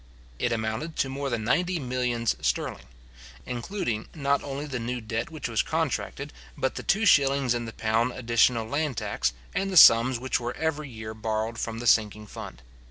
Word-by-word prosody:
It 120 Hz, -, 0 dB
amounted 115 Hz, +8 st, -2 dB
to 135 Hz, -, 0 dB
more 140 Hz, +1 st, -3 dB
than 115 Hz, -3 st, -2 dB
ninety 175 Hz, +10 st, +1 dB
millions 125 Hz, -4 st, -1 dB
sterling, 60 Hz, -, -2 dB, 0.6 s
including 120 Hz, -, -3 dB
not 140 Hz, -2 st, +1 dB
only 140 Hz, +1 st, -4 dB
the 135 Hz, -4 st, -4 dB
new 120 Hz, +2 st, -3 dB
debt 110 Hz, 0 st, -3 dB
which 155 Hz, -5 st, -5 dB
was 115 Hz, -3 st, +1 dB
contracted, -, -, -2 dB, 0.2 s
but 130 Hz, -, 0 dB
the -, -, -5 dB
two 215 Hz, +3 st, +1 dB
shillings 140 Hz, -7 st, +4 dB
in 120 Hz, -1 st, -3 dB
the 115 Hz, -, -7 dB
pound 115 Hz, +3 st, 0 dB
additional 115 Hz, -1 st, +2 dB
land 145 Hz, 0 st, -1 dB
tax, 60 Hz, -, -1 dB, 0.2 s
and 195 Hz, -, -1 dB
the 185 Hz, -, +1 dB
sums 120 Hz, -3 st, +8 dB
which 130 Hz, +2 st, -1 dB
were 120 Hz, 0 st, -4 dB
every 155 Hz, -2 st, -2 dB
year 110 Hz, -2 st, -7 dB
borrowed 110 Hz, +1 st, -3 dB
from 115 Hz, -1 st, -3 dB
the 120 Hz, -, -6 dB
sinking 105 Hz, -2 st, +3 dB
fund. -, -, -9 dB
120 Hz, 180 wpm, -27 LUFS, 115-140 Hz, 0.6 s, sums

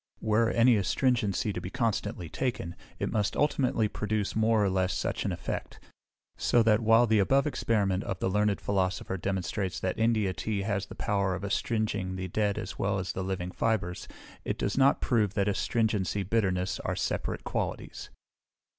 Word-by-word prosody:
Were 110 Hz, +1 st, +2 dB
any 115 Hz, 0 st, +5 dB
astringent 110 Hz, 0 st, +1 dB
to 105 Hz, +3 st, -2 dB
be 90 Hz, -, -5 dB
constantly 115 Hz, -7 st, -2 dB
taken, 120 Hz, -4 st, -3 dB, 0.2 s
it -, -, -2 dB
must 105 Hz, -3 st, 0 dB
ultimately 135 Hz, -6 st, +2 dB
produce 105 Hz, 0 st, -2 dB
more 110 Hz, -1 st, +3 dB
or -, -, +2 dB
less 95 Hz, 0 st, +1 dB
such -, -, -2 dB
an -, -, 0 dB
effect; -, -, -5 dB, 0.6 s
so 120 Hz, -, +3 dB
that 110 Hz, -1 st, +4 dB
while 115 Hz, +1 st, +5 dB
the 110 Hz, -2 st, +3 dB
above 135 Hz, +8 st, +3 dB
experiment 105 Hz, -9 st, 0 dB
of 95 Hz, -, -3 dB
the -, -, -1 dB
learned 105 Hz, +1 st, +1 dB
Philosopher 95 Hz, -1 st, -1 dB
demonstrates 95 Hz, 0 st, -2 dB
that 95 Hz, +2 st, -2 dB
India 110 Hz, -4 st, +2 dB
tea 100 Hz, 0 st, -2 dB
has 100 Hz, -1 st, -1 dB
the -, -, -10 dB
power 100 Hz, -3 st, 0 dB
of 95 Hz, -, -7 dB
astringing 100 Hz, -2 st, -1 dB
the 95 Hz, 0 st, -4 dB
dead 100 Hz, +2 st, 0 dB
as 95 Hz, -, -6 dB
well 100 Hz, 0 st, +1 dB
as 95 Hz, -1 st, -2 dB
the 95 Hz, -, -4 dB
living 95 Hz, -1 st, -3 dB
fibres, 95 Hz, -5 st, -1 dB, 0.4 s
it -, -, -2 dB
does 100 Hz, -, -1 dB
not 135 Hz, +1 st, +4 dB
prove 105 Hz, -5 st, +1 dB
that 100 Hz, -1 st, +1 dB
astringency 105 Hz, -1 st, 0 dB
bitterness 95 Hz, -3 st, 0 dB
are -, -, -2 dB
separate -, -, -2 dB
qualities. -, -, -4 dB
105 Hz, 175 wpm, -29 LUFS, 95-115 Hz, 0.6 s, any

